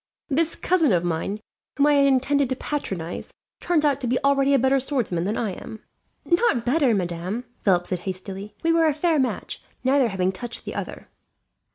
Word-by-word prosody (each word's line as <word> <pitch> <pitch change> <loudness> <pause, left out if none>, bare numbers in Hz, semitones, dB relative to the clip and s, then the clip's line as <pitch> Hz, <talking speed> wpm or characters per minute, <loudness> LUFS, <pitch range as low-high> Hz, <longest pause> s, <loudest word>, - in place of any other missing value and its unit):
"This 315 +3 +1
cousin 335 -7 +2
of 175 -2 +2
mine, 175 +5 -2 0.4
whom 285 - +4
I 295 - +5
had 280 -1 +5
intended 275 0 +2
to 260 - 0
patronize, 190 - -4 0.3
turns 330 -4 +1
out 280 -2 +2
to 250 - -2
be 250 +2 +1
already 275 0 +3
a - - +6
better 265 +2 +3
swordsman 240 - -1
than 210 +3 -1
I 220 -4 -1
am." 220 +4 -9 0.4
"Not 345 - +2
better, 260 -2 +3
madame," 180 +5 -3 0.2
Philip 180 -3 +3
said 185 - -2
hastily. 195 +3 -6
"We 330 0 +3
were 330 -1 +4
a 300 - +1
fair 320 0 +2
match, 260 - -2 0.2
neither 265 0 +3
having 190 -3 0
touched 235 +5 -7
the - - -5
other." - - -6
255 Hz, 190 wpm, -24 LUFS, 195-285 Hz, 0.4 s, a